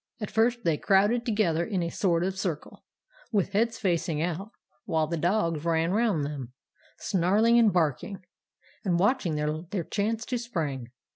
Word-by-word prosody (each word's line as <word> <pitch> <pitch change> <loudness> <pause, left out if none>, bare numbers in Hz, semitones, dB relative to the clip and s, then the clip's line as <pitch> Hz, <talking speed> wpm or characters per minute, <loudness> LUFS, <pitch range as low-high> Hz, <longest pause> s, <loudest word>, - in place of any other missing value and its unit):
"At 210 - -5
first 235 +2 +2
they 165 -3 +2
crowded 205 +7 +2
together 180 -7 +1
in 185 -2 -1
a 170 - -3
sort 175 -3 +1
of 190 +1 -1
circle, 175 -6 -4 0.5
with 200 -3 +1
heads 225 +2 +1
facing 170 -6 0
out; 175 +5 -2 0.4
while 160 -1 +1
the 165 +2 -3
dogs 170 -2 0
ran 165 0 +1
round 205 -8 +1
them, 135 -4 -6 0.4
snarling 210 +5 +3
and 225 -3 +5
barking, 175 +3 -1 0.6
and 180 -4 +1
watching 195 - +1
their 155 +5 -2
chance 220 +5 -2
to 250 -1 -2
spring. 155 - -3
185 Hz, 155 wpm, -27 LUFS, 165-215 Hz, 0.6 s, and